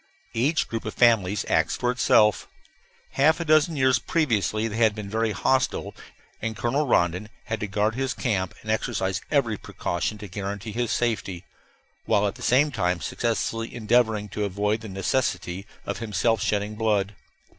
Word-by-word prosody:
Each 150 Hz, +7 st, +1 dB
group 115 Hz, -1 st, -4 dB
of -, -, -5 dB
families 105 Hz, -5 st, +3 dB
acts -, -, +2 dB
for 125 Hz, -, 0 dB
itself. 105 Hz, -4 st, +3 dB, 0.6 s
Half 155 Hz, +5 st, +3 dB
a 170 Hz, -, -2 dB
dozen 155 Hz, +1 st, +4 dB
years 130 Hz, -3 st, +3 dB
previously 115 Hz, -, 0 dB
they 110 Hz, 0 st, -5 dB
had 110 Hz, -2 st, +3 dB
been 105 Hz, -2 st, -6 dB
very 110 Hz, 0 st, +1 dB
hostile, 130 Hz, +5 st, 0 dB, 0.5 s
and 110 Hz, -1 st, -3 dB
Colonel 135 Hz, +7 st, 0 dB
Rondon 90 Hz, 0 st, +1 dB
had 110 Hz, -, -3 dB
to 105 Hz, -, -3 dB
guard 105 Hz, +2 st, 0 dB
his 135 Hz, +2 st, -2 dB
camp 95 Hz, -7 st, -1 dB
and 110 Hz, -, -2 dB
exercise 100 Hz, -4 st, -1 dB
every 120 Hz, -8 st, +1 dB
precaution 90 Hz, +4 st, -3 dB
to 105 Hz, 0 st, -8 dB
guarantee 100 Hz, +2 st, -5 dB
his 120 Hz, +2 st, -1 dB
safety, 100 Hz, -7 st, -1 dB, 0.6 s
while 105 Hz, 0 st, +2 dB
at 100 Hz, -, 0 dB
the 125 Hz, -, -14 dB
same 130 Hz, +6 st, +3 dB
time 90 Hz, -7 st, 0 dB
successfully 115 Hz, +5 st, -2 dB
endeavoring 110 Hz, -2 st, +2 dB
to 105 Hz, -, -3 dB
avoid 105 Hz, +2 st, 0 dB
the 110 Hz, -, -8 dB
necessity 95 Hz, -2 st, -1 dB, 0.2 s
of -, -, -4 dB
himself 110 Hz, 0 st, 0 dB
shedding 105 Hz, 0 st, 0 dB
blood. 105 Hz, -2 st, 0 dB
110 Hz, 165 wpm, -25 LUFS, 100-120 Hz, 0.6 s, dozen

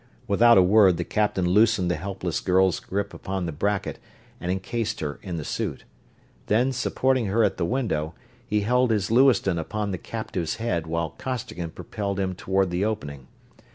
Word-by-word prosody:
Without 115 Hz, +3 st, +6 dB
a 95 Hz, -, +7 dB
word 95 Hz, -2 st, +5 dB
the 85 Hz, -, -1 dB
captain 105 Hz, -1 st, 0 dB
loosened 105 Hz, -1 st, +3 dB
the -, -, +1 dB
helpless 95 Hz, 0 st, -3 dB
girl's 95 Hz, -2 st, +2 dB
grip 100 Hz, +1 st, -3 dB
upon 95 Hz, -2 st, -4 dB
the 85 Hz, -, -3 dB
bracket 100 Hz, +6 st, -2 dB, 0.4 s
and 90 Hz, +1 st, -2 dB
encased 110 Hz, +4 st, -2 dB
her 75 Hz, -2 st, -4 dB
in 90 Hz, -3 st, -5 dB
the 80 Hz, -, -4 dB
suit. -, -, -3 dB, 0.6 s
Then, 120 Hz, +5 st, +2 dB
supporting 130 Hz, -1 st, 0 dB
her 110 Hz, +4 st, +2 dB
at 100 Hz, -2 st, +1 dB
the 85 Hz, -, 0 dB
window, 85 Hz, -, -1 dB, 0.3 s
he 105 Hz, 0 st, +1 dB
held 125 Hz, +4 st, +2 dB
his 105 Hz, -2 st, 0 dB
Lewiston 120 Hz, -8 st, +4 dB
upon 105 Hz, +5 st, -3 dB
the 95 Hz, -, -3 dB
captive's 95 Hz, -7 st, -4 dB
head 90 Hz, -9 st, -2 dB
while 85 Hz, 0 st, -2 dB
Costigan 110 Hz, -9 st, -4 dB
propelled 100 Hz, +3 st, -4 dB
him 95 Hz, -1 st, -1 dB
toward 95 Hz, 0 st, 0 dB
the 90 Hz, +2 st, 0 dB
opening. 70 Hz, -12 st, -4 dB
95 Hz, 175 wpm, -25 LUFS, 90-110 Hz, 0.6 s, a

